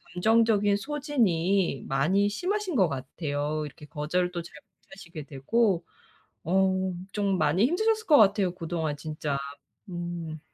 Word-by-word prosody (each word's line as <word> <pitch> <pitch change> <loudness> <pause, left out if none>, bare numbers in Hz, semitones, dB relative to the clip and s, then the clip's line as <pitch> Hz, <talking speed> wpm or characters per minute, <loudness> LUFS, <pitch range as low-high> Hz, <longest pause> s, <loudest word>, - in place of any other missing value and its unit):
감정적인 215 +1 +3
소진이 200 - 0
많이 180 +10 +2
심하신 370 - -2
것 190 -8 +4
같아요. 145 +2 -3
이렇게 150 0 -11
거절도 175 +4 -1
잘 - - -13
못 - - -22
하시게 170 -5 -9
되고. 175 - 0 0.6
어 190 +1 +2 0.2
좀 200 -2 0
많이 190 +4 +3
힘드셨을 435 - +1
것 300 - +7
같아요. 200 -3 +4
그동안 165 -4 -3
진짜. 150 -2 -3 0.5
음. 175 -3 -5
180 Hz, 270 characters per minute, -27 LUFS, 155-210 Hz, 0.6 s, 것